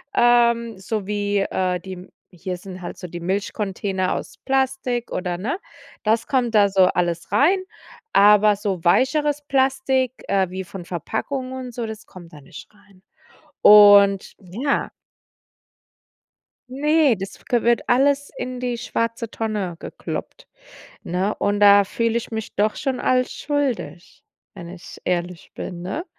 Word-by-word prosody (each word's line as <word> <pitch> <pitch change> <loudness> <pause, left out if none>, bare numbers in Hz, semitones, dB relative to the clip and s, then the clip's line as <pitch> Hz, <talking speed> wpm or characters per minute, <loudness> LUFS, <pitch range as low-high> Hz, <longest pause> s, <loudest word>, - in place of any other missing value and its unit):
Ähm, 235 -2 +3
so 200 +1 -3
wie, 205 0 -1
äh, 185 -2 -1
die 185 0 -9 0.3
hier 180 +1 -5
sind 185 0 -10
halt 175 - -7
so 180 - -8
die 175 0 -7
Milchcontainer 190 +1 -2
aus - - -7
Plastik 265 -2 -1
oder 180 -1 -3
ne, 260 - -3 0.4
das 220 +1 +1
kommt 245 -4 0
da 205 -1 +5
so 190 -1 +4
alles 175 -2 -1
rein. 370 +7 +3 0.5
Aber 210 +1 +6
so 195 -4 -3
weicheres 290 - +2
Plastik, 265 -1 +1
äh, 190 -2 +1
wie 190 +1 -5
von 180 -1 -9
Verpackung 255 - -4
und 255 -2 -7
so, 235 -1 -4
das 220 0 -8
kommt 175 -3 -14
da 150 - -12
nicht 135 - -12
rein. 200 -2 -24 0.6
Und 205 -2 +7
ja. 220 +10 -2 1.8
Ne, 295 0 +2
das 195 0 -9
kö 240 -2 +1
wird 235 0 +1
alles 280 +3 +2
in 255 0 -5
die 245 -1 -2
schwarze 230 -1 -3
Tonne 210 -6 -3
gekloppt, - - -7 0.6
ne? 185 +4 -1
Und 205 0 0
da 200 -1 +7
fühle 230 +3 -1
ich 235 - -8
mich 220 -1 -5
doch 210 +2 +1
schon 265 -2 -2
als 255 0 +1
schuldig, 255 - -3 0.3
wenn 175 -4 -10
ich 175 0 -11
ehrlich 175 -1 -3
bin, 175 -2 -7
ne? 195 - -4
210 Hz, 145 wpm, -22 LUFS, 185-250 Hz, 1.8 s, Und